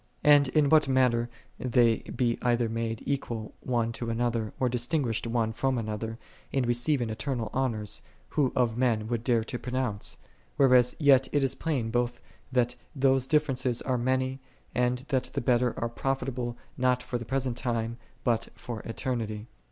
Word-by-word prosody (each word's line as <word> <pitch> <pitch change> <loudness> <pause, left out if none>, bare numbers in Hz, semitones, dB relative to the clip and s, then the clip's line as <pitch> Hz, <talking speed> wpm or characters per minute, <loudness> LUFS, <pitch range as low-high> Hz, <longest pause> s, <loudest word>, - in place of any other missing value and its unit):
And 145 -1 +7
in 150 +2 +3
what 155 -1 +5
manner 125 -3 +2 0.3
they 120 -3 +3
be 120 -2 -1
either 120 -1 +2
made 115 0 -3
equal 120 -6 -3
one 120 -2 0
to 115 0 -4
another, 115 -1 0
or 130 - +2
dis 120 0 -1
tinguished 125 -7 0
one 115 -1 0
from 135 +2 0
another, 110 0 -3 0.3
in 135 -2 +1
receiving 120 0 +1
eternal 115 -1 -3
honors, 115 -6 -1 0.3
who 140 -4 +1
of 120 -4 +2
men 120 -3 +1
would 120 -1 -1
dare 120 -3 +2
to 120 +2 -5
pronounce? 125 -5 -2 0.4
whereas 125 -2 +5
yet 135 -3 +5
it 145 -1 +2
is 135 - +2
plain 130 -9 -2
both 120 0 0 0.3
that 125 -1 +2 0.2
those 135 -1 +3
differences 130 -4 +2
are 130 -2 0
many, 130 +2 0 0.3
and 125 +2 +1
that 130 -2 +1
the - - -3
better 120 0 +1
are 115 - 0
profitable 125 -1 -2 0.2
not 125 0 +2
for 120 - -3
the - - -5
present 130 0 -1
time,! 115 -2 -2 0.3
but 115 -2 +1
for 120 -3 -6
eternity. 115 -2 -3
125 Hz, 165 wpm, -28 LUFS, 115-130 Hz, 0.4 s, And